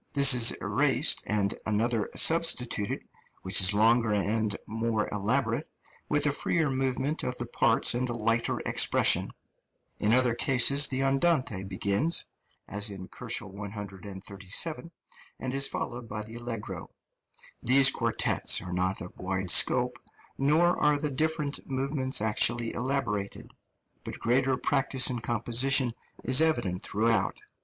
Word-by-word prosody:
This 140 Hz, -2 st, +7 dB
is 120 Hz, -2 st, +6 dB
erased -, -, +1 dB
and 100 Hz, -2 st, 0 dB
another 110 Hz, +1 st, -1 dB
substituted, 125 Hz, -10 st, +2 dB, 0.4 s
which 95 Hz, +1 st, +4 dB
is 95 Hz, +2 st, +5 dB
longer 115 Hz, +2 st, +2 dB
and 105 Hz, +1 st, -1 dB
more 115 Hz, -1 st, -2 dB
elaborate, 105 Hz, +1 st, -2 dB, 0.4 s
with 150 Hz, 0 st, +1 dB
a 145 Hz, -, +2 dB
freer 155 Hz, +1 st, 0 dB
movement 135 Hz, +3 st, -1 dB
of 125 Hz, -, -4 dB
the -, -, -3 dB
parts -, -, +2 dB
and 125 Hz, +1 st, -2 dB
a -, -, -3 dB
lighter 115 Hz, +1 st, -1 dB
expression. -, -, +2 dB, 0.7 s
In 105 Hz, -, +1 dB
other 125 Hz, 0 st, +3 dB
cases 135 Hz, +3 st, +4 dB
the 130 Hz, 0 st, -2 dB
andante 135 Hz, -, 0 dB
begins 100 Hz, -, 0 dB, 0.4 s
(as 105 Hz, +1 st, -1 dB
in 95 Hz, -2 st, -10 dB
137 100 Hz, -, -4 dB
K.), 170 Hz, -, -14 dB, 0.5 s
and 130 Hz, 0 st, -4 dB
is 135 Hz, 0 st, +2 dB
followed 120 Hz, -1 st, -6 dB
by 105 Hz, 0 st, -5 dB
the 110 Hz, +1 st, -13 dB
allegro. 120 Hz, -2 st, -7 dB, 0.7 s
These 130 Hz, +2 st, +4 dB
quartets -, -, +1 dB
are 90 Hz, -, -7 dB
not 95 Hz, +2 st, -2 dB
of 90 Hz, -, -9 dB
wide 95 Hz, 0 st, -2 dB
scope, -, -, +3 dB, 0.4 s
nor 155 Hz, +6 st, +2 dB
are 150 Hz, 0 st, +3 dB
the 150 Hz, 0 st, -4 dB
different 150 Hz, +1 st, -1 dB
movements 135 Hz, -1 st, -1 dB
actually 115 Hz, +2 st, 0 dB
elaborated, 120 Hz, -6 st, -4 dB, 0.5 s
but -, -, -7 dB
greater 130 Hz, +2 st, 0 dB
practice 135 Hz, -2 st, +2 dB
in 125 Hz, -, -3 dB
composition 120 Hz, +3 st, +1 dB, 0.3 s
is 130 Hz, +3 st, +3 dB
evident 120 Hz, -, 0 dB
throughout. 110 Hz, -1 st, -1 dB
120 Hz, 130 wpm, -27 LUFS, 105-135 Hz, 0.7 s, This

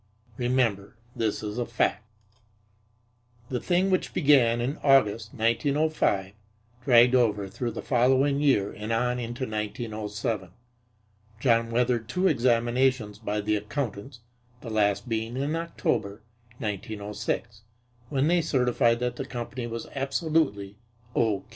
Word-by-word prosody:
Remember 120 Hz, -4 st, 0 dB, 0.2 s
that -, -, -15 dB
this 110 Hz, -1 st, -1 dB
is 105 Hz, +3 st, -4 dB
a 120 Hz, -, 0 dB
fact. 115 Hz, -1 st, 0 dB, 1.5 s
The 125 Hz, -, -1 dB
thing, 185 Hz, +5 st, +1 dB
which 185 Hz, -, 0 dB
began 135 Hz, -7 st, +4 dB
in 130 Hz, +6 st, -2 dB
August, 115 Hz, -6 st, +3 dB
1905, 115 Hz, -4 st, +1 dB, 0.5 s
dragged 120 Hz, -1 st, +6 dB
over 105 Hz, -6 st, +2 dB
through 120 Hz, +5 st, -4 dB
the 115 Hz, -, -6 dB
following 135 Hz, +3 st, +3 dB
year 130 Hz, -9 st, +2 dB
and 105 Hz, +2 st, -6 dB
on 125 Hz, +2 st, 0 dB
into 120 Hz, +2 st, -4 dB
1907. 105 Hz, -3 st, -3 dB, 0.9 s
John 115 Hz, -2 st, +2 dB
weathered 120 Hz, -1 st, 0 dB
two 180 Hz, +7 st, +1 dB
examinations 120 Hz, -, +1 dB
by 105 Hz, -1 st, -2 dB
the 105 Hz, +1 st, 0 dB
accountants, 115 Hz, +2 st, -4 dB, 0.4 s
the 115 Hz, -, -7 dB
last 100 Hz, -1 st, +1 dB
being 115 Hz, +1 st, -2 dB
in 145 Hz, +4 st, -1 dB
October, 110 Hz, -11 st, -2 dB, 0.3 s
1906, 105 Hz, +1 st, -4 dB, 0.5 s
when 140 Hz, 0 st, +1 dB
they 175 Hz, +1 st, +3 dB
certified 125 Hz, -6 st, +2 dB
that 125 Hz, 0 st, -2 dB
the 135 Hz, -, -4 dB
company 120 Hz, -1 st, -5 dB
was 115 Hz, 0 st, -5 dB
absolutely 135 Hz, -, -1 dB, 0.4 s
"O. 110 Hz, -4 st, +1 dB
120 Hz, 125 wpm, -27 LUFS, 105-130 Hz, 1.5 s, dragged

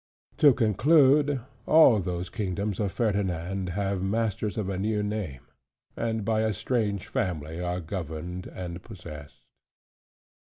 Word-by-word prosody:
To 145 Hz, -, +7 dB
conclude, 140 Hz, -, +4 dB, 0.3 s
all 155 Hz, -9 st, +7 dB
those 90 Hz, -1 st, -3 dB
kingdoms 100 Hz, -1 st, -2 dB
of 100 Hz, -3 st, 0 dB
Ferdinand 95 Hz, -4 st, -1 dB
have 100 Hz, +1 st, -1 dB
masters 105 Hz, +1 st, -1 dB
of 105 Hz, -3 st, -1 dB
a 100 Hz, -, -2 dB
new 105 Hz, +1 st, 0 dB
name; 105 Hz, -, -4 dB, 0.5 s
and 110 Hz, -2 st, -2 dB
by 110 Hz, 0 st, +1 dB
a 110 Hz, -1 st, +1 dB
strange 105 Hz, -2 st, -1 dB
family 80 Hz, -2 st, -2 dB
are 90 Hz, 0 st, -2 dB
governed 90 Hz, 0 st, -5 dB
and 90 Hz, -1 st, -7 dB
possessed. 75 Hz, -4 st, -11 dB
100 Hz, 125 wpm, -27 LUFS, 90-110 Hz, 0.5 s, To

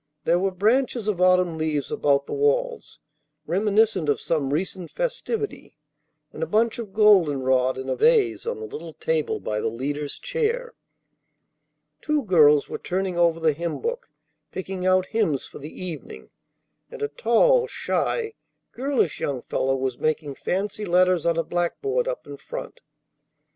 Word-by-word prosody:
There 175 Hz, -, +3 dB
were 195 Hz, +1 st, +1 dB
branches 220 Hz, +4 st, +1 dB
of 195 Hz, -4 st, -1 dB
autumn 180 Hz, -3 st, +3 dB
leaves 150 Hz, -3 st, -1 dB
about 140 Hz, -1 st, +2 dB
the -, -, -6 dB
walls, 480 Hz, +3 st, 0 dB, 0.5 s
reminiscent 200 Hz, -1 st, +2 dB
of 145 Hz, -, +2 dB
some 145 Hz, -4 st, -1 dB
recent 180 Hz, +3 st, -2 dB
festivity, 475 Hz, -3 st, -4 dB, 0.6 s
and -, -, -8 dB
a 485 Hz, -, 0 dB
bunch 230 Hz, +2 st, +1 dB
of 220 Hz, -4 st, -6 dB
golden 190 Hz, -10 st, +4 dB
rod 130 Hz, 0 st, +2 dB
in 130 Hz, 0 st, -6 dB
a -, -, 0 dB
vase 450 Hz, -5 st, +3 dB
on 475 Hz, -1 st, -2 dB
the 440 Hz, -, -5 dB
little 165 Hz, -, -8 dB
table 160 Hz, -1 st, -1 dB
by 105 Hz, 0 st, -3 dB
the -, -, 0 dB
leader's 140 Hz, +6 st, -3 dB
chair. 485 Hz, 0 st, -2 dB, 1.3 s
Two 300 Hz, -2 st, 0 dB
girls 150 Hz, -7 st, +5 dB
were -, -, -5 dB
turning 185 Hz, 0 st, -2 dB
over 170 Hz, -1 st, +3 dB
the 160 Hz, -2 st, +3 dB
hymn 170 Hz, +2 st, -4 dB
book, 480 Hz, +1 st, -4 dB, 0.4 s
picking 190 Hz, -1 st, -4 dB
out 185 Hz, 0 st, +4 dB
hymns 185 Hz, -, 0 dB
for -, -, -11 dB
the 150 Hz, +2 st, -7 dB, 0.2 s
evening; 165 Hz, -5 st, -8 dB, 0.6 s
and 475 Hz, -2 st, -7 dB
a -, -, +1 dB
tall, -, -, +3 dB
shy, 455 Hz, -1 st, -1 dB, 0.4 s
girlish 265 Hz, -, 0 dB
young 130 Hz, -4 st, -2 dB
fellow 135 Hz, 0 st, 0 dB
was 130 Hz, -2 st, -2 dB
making 155 Hz, -2 st, -1 dB
fancy 195 Hz, +8 st, -3 dB
letters 180 Hz, -2 st, +3 dB
on 170 Hz, -1 st, +2 dB
a 165 Hz, -, +1 dB
blackboard 410 Hz, -, -1 dB
up -, -, -4 dB
in -, -, -9 dB
front. -, -, -8 dB
185 Hz, 160 wpm, -24 LUFS, -, 1.3 s, girls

